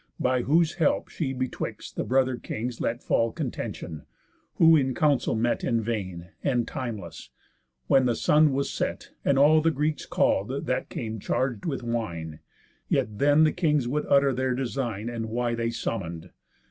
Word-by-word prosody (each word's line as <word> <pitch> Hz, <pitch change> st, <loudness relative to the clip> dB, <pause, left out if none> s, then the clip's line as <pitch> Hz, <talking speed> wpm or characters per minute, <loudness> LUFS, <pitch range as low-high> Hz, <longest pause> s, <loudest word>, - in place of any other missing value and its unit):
By 125 Hz, 0 st, +2 dB
whose 160 Hz, +5 st, +3 dB
help 150 Hz, -, +2 dB
she 145 Hz, -6 st, -3 dB
betwixt 130 Hz, -1 st, -4 dB
the -, -, -1 dB
brother 130 Hz, 0 st, +2 dB
kings 120 Hz, 0 st, -5 dB
Let 115 Hz, +1 st, -2 dB
fall 115 Hz, 0 st, +1 dB
contention; 80 Hz, -7 st, -5 dB, 0.5 s
who 165 Hz, 0 st, +7 dB
in 130 Hz, -4 st, +1 dB
council 145 Hz, -7 st, +2 dB
met 120 Hz, +2 st, 0 dB
In 115 Hz, -2 st, +1 dB
vain, 95 Hz, -6 st, -4 dB
and 125 Hz, -5 st, +1 dB
timeless, 105 Hz, -, -6 dB, 0.6 s
when 130 Hz, -, +4 dB
the 120 Hz, -, +1 dB
sun 150 Hz, 0 st, +4 dB
was 140 Hz, +1 st, -1 dB
set, -, -, -3 dB
And 140 Hz, -, +2 dB
all 155 Hz, +3 st, +6 dB
the 165 Hz, -, +3 dB
Greeks 150 Hz, 0 st, -1 dB
call'd, -, -, 0 dB
that -, -, -1 dB
came 110 Hz, -1 st, -5 dB
charg'd 120 Hz, +1 st, -1 dB
with 135 Hz, -5 st, -3 dB
wine. 85 Hz, -10 st, -4 dB, 0.5 s
Yet 105 Hz, -1 st, 0 dB
then 145 Hz, +2 st, +5 dB
the 155 Hz, -, +4 dB
kings 150 Hz, -7 st, +1 dB
would 150 Hz, +4 st, -1 dB
utter 140 Hz, -1 st, +4 dB
their 130 Hz, 0 st, 0 dB
design, 120 Hz, -4 st, -3 dB
And 115 Hz, -1 st, -3 dB
why 120 Hz, +1 st, -1 dB
they 115 Hz, 0 st, -1 dB
summon'd. 90 Hz, -7 st, -4 dB
125 Hz, 165 wpm, -26 LUFS, 115-140 Hz, 0.6 s, who